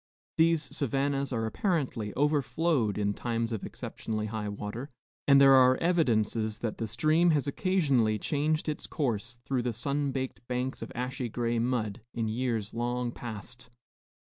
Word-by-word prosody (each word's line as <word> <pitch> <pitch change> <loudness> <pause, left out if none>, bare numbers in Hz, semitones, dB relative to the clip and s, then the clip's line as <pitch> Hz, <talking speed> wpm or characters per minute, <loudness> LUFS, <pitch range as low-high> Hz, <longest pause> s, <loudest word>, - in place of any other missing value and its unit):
These 165 -1 +4
savannas 140 +1 0
are 115 -3 -1
apparently 125 - -1
overflowed 145 - +1
in 100 -1 +1
times 115 +1 -2
of 110 -4 -3
exceptionally 110 -1 -4
high 110 -1 -3
water; 105 +6 -5 0.4
and 140 -1 +7
there 135 -1 +8
are 130 -1 +6
evidences 115 - +1
that 110 -2 -4
the 115 - -2
stream 155 +10 +3
has 150 -4 +2
occasionally 140 - +2
changed 155 +7 0
its 150 - -2
course, 120 -5 -2
through 130 -2 0
the 120 -1 -1
sunbaked 135 +2 -2
banks 125 +1 -2
of - - -6
ashy 125 0 -3
gray 115 +1 -1
mud, 115 -2 -1
in 115 -1 -1
years 115 -2 -2
long 120 +1 -1
past. 120 +2 -8
125 Hz, 145 wpm, -29 LUFS, 110-140 Hz, 0.4 s, there